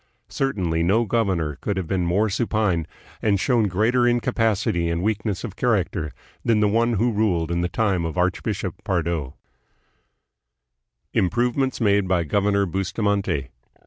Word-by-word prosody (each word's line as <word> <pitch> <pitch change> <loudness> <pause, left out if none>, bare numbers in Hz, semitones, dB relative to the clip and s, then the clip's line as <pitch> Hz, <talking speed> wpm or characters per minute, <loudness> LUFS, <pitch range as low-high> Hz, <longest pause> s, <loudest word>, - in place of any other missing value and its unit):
Certainly 95 -12 -1
no 100 +8 +2
governor 95 -9 0
could 100 -2 -2
have' 95 - -1
been 90 0 -1
more 100 +6 +2
supine, 100 -5 0 0.3
and 100 -3 +2
shown 115 -1 +2
greater 115 +6 +2
incapacity 110 -7 +1
and 85 +1 -1
weakness 105 -1 -1
of 105 -6 -6
character, 100 - 0 0.3
than 115 -3 +2
the 105 - +3
one 115 +3 +2
who 115 +3 +1
ruled 90 -7 0
in 85 0 0
the 90 - -1
tune 95 -4 0
of 80 0 -4
Archbishop 90 0 -1
Pardo. 85 -6 -2 1.8
Improvements 125 +7 +1
Made 100 -3 +2
by 90 -2 +2
Governor 100 +4 +1
Bustamante. 95 - -1
100 Hz, 140 wpm, -23 LUFS, 85-110 Hz, 1.8 s, the